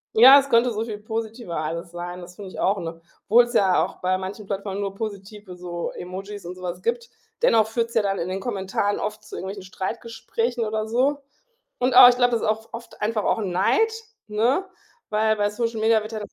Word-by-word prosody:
Ja, 265 +5 +10
es 275 0 -4
könnte 240 0 +4
so 220 0 -2
viel 215 -3 -6
positiver 220 -3 -5
alles 165 +2 -4
sein. 175 +1 -6
Das 175 +1 -11
finde 195 -1 -9
ich - - -9
auch, 195 +1 +1
ne? 165 0 -6 0.3
Obwohl's 240 +3 +5
ja 190 -5 +4
auch - - -5
bei 185 +1 +1
manchen 190 +3 -6
Plattformen 195 0 -4
nur 195 -1 -3
positive 205 -2 -7
so 175 -1 -5
Emojis 195 +2 -8
und 180 +1 -6
so 185 - -13
was 180 0 -5
gibt. 235 +2 -2 0.3
Dennoch 225 - +4
führt's 230 +1 -2
ja 225 - +3
dann 195 -1 -1
in 170 - -3
den 190 +1 -3
Kommentaren 200 -1 -1
oft 215 +1 -4
zu 215 - -10
irgendwelchen 195 +1 -6
Streitgesprächen 230 +4 -3
oder 215 0 -2
so. 260 +6 +1 0.6
Und 250 +1 +1
aber 245 - +11
ich 245 - +3
glaube, 245 -1 +3
das 235 - 0
ist - - -1
auch 220 +1 -1
oft 230 +1 -10
einfach 215 0 0
auch - - +1
Neid, 200 - +2 0.4
ne, 230 - +1 0.4
weil 220 +1 +2
bei 205 0 +1
Social 230 +1 -2
Media 220 0 +3
wird 215 +1 -8
ja 220 - -4
210 Hz, 215 wpm, -24 LUFS, 190-230 Hz, 0.6 s, aber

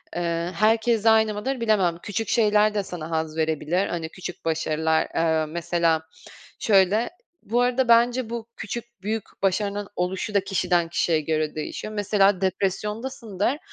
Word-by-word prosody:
eee, 170 0 -1
herkes 225 +2 +2
aynı 220 -1 +5
mıdır 250 +4 -3
bilemem. 195 -7 +2
Küçük 210 +2 -3
şeyler 215 -2 +3
de 205 -1 0
sana 170 -4 -7
haz 160 0 -2
verebilir. 160 +4 0
Hani, 165 -2 -4
küçük 180 -1 -8
başarılar, 160 0 +1
eee, 160 -1 +2
mesela, 170 0 0 0.6
şöyle 205 +2 +3 0.4
Bu 240 +3 +1
arada 250 0 +2
bence 235 +1 +4
bu 230 -1 -5
küçük 235 0 -7
büyük 215 +1 -2 0.2
başarının 200 +1 0
oluşu 185 +4 -2
da 200 - +4
kişiden 175 -3 +1
kişiye 165 -1 +1
göre 155 0 -1
değişiyor. 215 +7 -5
Mesela 200 -2 +2
depresyondasındır, 210 +5 -2
195 Hz, 140 wpm, -24 LUFS, 170-220 Hz, 0.6 s, aynı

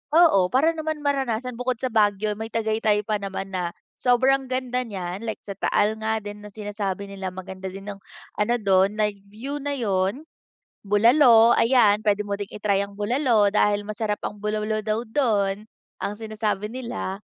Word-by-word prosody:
Oo, 320 - +6
para 275 - +3
naman 315 -2 -4
maranasan 250 -4 -1
bukod 250 0 0
sa 255 - -1
Baguio 210 -1 +2
may 220 +2 -5
tagaytay 220 -2 0
pa 210 0 -1
naman 195 -1 -5
na 180 -2 -3 0.2
sobrang 260 +2 +3
ganda 255 -1 -1
niya. 185 -3 -5
Like 220 0 -5
sa 200 - -7
taal 215 +1 +1
nga 220 -1 -1
din 205 0 -7
na 210 - -10
sinasabi 200 -1 -5
nila 195 -1 -5
maganda 190 +1 -7
din 195 +2 -7
ang 200 - -10 0.4
ano 230 +3 +2
dun 195 -2 +2
live 210 -2 0
view 260 +8 -6
na 285 0 -2
yun. 200 +2 0 0.6
Bulalo, 230 +3 +6
ayan. 225 -4 +4
Pwede 210 -1 +1
mo 200 - -2
din 200 0 -5
i-try 200 -2 0
ang 200 0 -8
bulalo 220 -2 +2
dahil 205 -1 +2
masarap 215 -1 -2
ang 210 0 -8
bulaulo 215 0 -1
daw 220 +2 -2
dun, 210 -5 +1 0.4
ang 205 - -2
sinasabi 215 0 -3
nila 235 -6 -5
215 Hz, 170 wpm, -24 LUFS, 200-240 Hz, 0.6 s, Oo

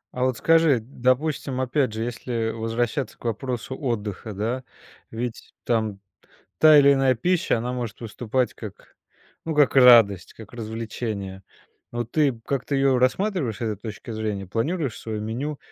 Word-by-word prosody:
А 125 - -1
вот 130 -2 0
скажи, 165 -4 +4
допустим, 130 +3 -1
опять 130 0 +1
же, 110 +1 -3
если 115 -1 -3
возвращаться 115 +4 -2
к - - -17
вопросу 120 +3 -3
отдыха, 110 -5 -4
да, 115 +6 -2 0.5
ведь, 115 +1 -6
там, 110 -4 -1 0.6
та 155 -1 +8
или 140 0 +7
иная 135 -2 +3
пища, 175 -1 +1
она 120 +2 -3
может 120 -4 -5
выступать 120 +2 -2
как, 105 -4 -11 0.5
ну, 160 -2 -3
как 145 -3 +4
радость, 115 -8 +6
как 110 -1 -13
развлечение. 110 -4 -5 0.5
Вот 120 -1 -4
ты 150 -3 +3
п 115 - -14
как-то 140 +1 -1
ее 135 -1 +3
рассматриваешь 130 - 0
с - - -15
этой 110 -3 -1
точки 110 +2 -8
зрения, 105 -3 -3
планируешь 135 - -2
свое 110 -2 -4
меню 130 +8 -4
120 Hz, 155 wpm, -24 LUFS, 110-135 Hz, 0.6 s, та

